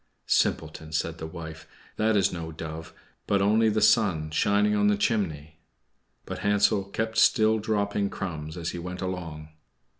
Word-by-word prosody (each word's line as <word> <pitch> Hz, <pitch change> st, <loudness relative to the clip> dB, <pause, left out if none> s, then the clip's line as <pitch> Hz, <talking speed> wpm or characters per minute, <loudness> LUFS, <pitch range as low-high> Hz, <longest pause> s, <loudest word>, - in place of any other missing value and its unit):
"Simpleton!" 80 Hz, 0 st, 0 dB
said 80 Hz, +1 st, -2 dB
the 80 Hz, -, -5 dB
wife, 80 Hz, -1 st, -9 dB, 0.3 s
"that 110 Hz, 0 st, +2 dB
is 95 Hz, -2 st, +2 dB
no 80 Hz, -2 st, -5 dB
dove, 80 Hz, 0 st, -7 dB, 0.4 s
but 100 Hz, -, +2 dB
only 110 Hz, +3 st, +3 dB
the 110 Hz, 0 st, +1 dB
sun 85 Hz, -9 st, +3 dB
shining 100 Hz, +6 st, +2 dB
on 105 Hz, 0 st, +3 dB
the 105 Hz, -1 st, +3 dB
chimney." 80 Hz, -9 st, -1 dB, 0.7 s
But -, -, -6 dB
Hansel 105 Hz, 0 st, +2 dB
kept 110 Hz, +3 st, -2 dB
still 110 Hz, -1 st, +4 dB
dropping 100 Hz, -2 st, 0 dB
crumbs 80 Hz, -4 st, -5 dB
as 85 Hz, 0 st, -3 dB
he 85 Hz, -, -6 dB
went 90 Hz, +2 st, -6 dB
along. 80 Hz, -4 st, -5 dB
95 Hz, 155 wpm, -27 LUFS, 80-105 Hz, 0.7 s, still